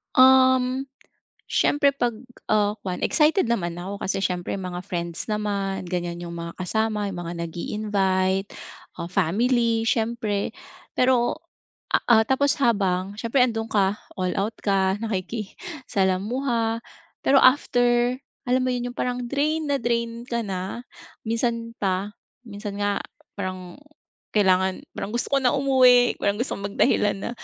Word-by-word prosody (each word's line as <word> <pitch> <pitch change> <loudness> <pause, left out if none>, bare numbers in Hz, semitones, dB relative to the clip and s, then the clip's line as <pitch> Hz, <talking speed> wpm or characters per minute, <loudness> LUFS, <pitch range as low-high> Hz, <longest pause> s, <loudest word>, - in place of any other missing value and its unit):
Um, 260 0 +5 0.6
siyempre 285 -1 +3
'pag, 245 -3 0 0.4
ah, 210 0 +2
kuwan 180 -1 -3
excited 305 - +3
naman 175 -7 0
ako 195 +3 -5
kasi 195 0 -1
siyempre 180 -2 -2
mga 180 -2 -5
friends 170 -1 -4
naman 205 -2 -2
ganyan 175 -1 -3
yung 170 0 -6
mga 170 0 -6
kasama, 215 +1 -1
yung 185 - -6
mga 170 - -4
nag-iinvite 190 +1 0 0.5
ah, 170 - -4
family 225 +5 +1
siyempre. 220 -3 -1 0.4
Pero, 250 -1 +2 0.7
ah, 220 -2 +7
tapos 275 +3 +2
habang 200 -6 +1
siyempre 240 +3 +3
andun 225 -2 -3
ka, 200 0 +1 0.2
all 185 -1 -1
out 215 +3 -1
ka, 195 -1 +2
nakikasalamuha 225 - -2 0.4
pero 275 - +4
after 245 -2 +4 0.3
alam 255 +1 +2
mo 255 - +1
'yon, 245 0 -2
yung 245 - -12
parang 250 0 -1
drain 300 +2 0
na 280 - +2
drain 235 -1 -2
ka 235 -2 -2
na. 195 +2 -4 0.4
Minsan 230 0 -2
pa 195 0 -1 0.3
minsan 205 -3 -7
nga 205 0 +1 0.4
parang 185 -2 -5 0.6
kailangan 190 -2 +3 0.2
parang 205 - -4
gusto 240 - -2
ko 275 - +3
na 255 -2 +2
umuwi, 255 -3 +5
parang 205 +3 0
gusto 255 - -3
kong 200 0 -5
magdahilan 205 -1 +2
na, - - -3
220 Hz, 135 wpm, -24 LUFS, 190-245 Hz, 0.7 s, ah